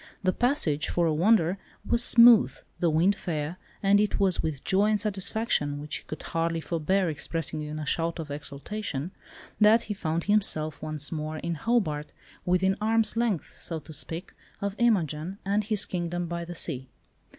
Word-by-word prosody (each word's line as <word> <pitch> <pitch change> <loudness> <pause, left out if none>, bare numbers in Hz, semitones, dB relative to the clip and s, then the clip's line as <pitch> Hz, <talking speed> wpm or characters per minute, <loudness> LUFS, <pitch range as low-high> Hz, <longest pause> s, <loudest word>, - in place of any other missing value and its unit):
The 185 0 +2
passage, 245 - +1
for 175 - +1
a 160 - +2
wonder, 185 +1 +3 0.3
was 235 - +4
smooth, 235 -2 +7 0.2
the 170 - +2
wind 170 +6 +3
fair, 160 -1 -4 0.3
and 200 +1 +5
it 210 0 +1
was 190 -3 +2
with 150 -4 -3
joy 195 +2 +3
and 215 -1 +2
satisfaction, 200 -7 -1
which 150 0 -4
he - - -13
could 155 - -7
hardly 165 0 -1
forbear 175 +4 0
expressing 160 0 -2
in 150 0 -5
a 155 - -4
shout 165 +3 -1
of 155 -3 -6
exultation, 145 +3 -5 0.5
that 220 +2 +6
he 210 - -4
found 165 -4 -2
himself 155 -8 +1
once 155 -2 -3
more 155 -1 -4
in 170 +2 -3
Hobart, 160 -6 -1 0.3
within 190 +2 +2
arm's 220 0 +2
length, 230 -7 -1
so 165 - -4
to 155 0 -10
speak, 160 +3 -5 0.3
of 200 0 -3
Imogen 185 - +1
and 205 +2 +1
his 210 -2 0
"kingdom 175 -1 -3
by 170 0 -4
the 175 +1 -7
sea." 130 -5 -4
175 Hz, 175 wpm, -27 LUFS, 155-205 Hz, 0.5 s, smooth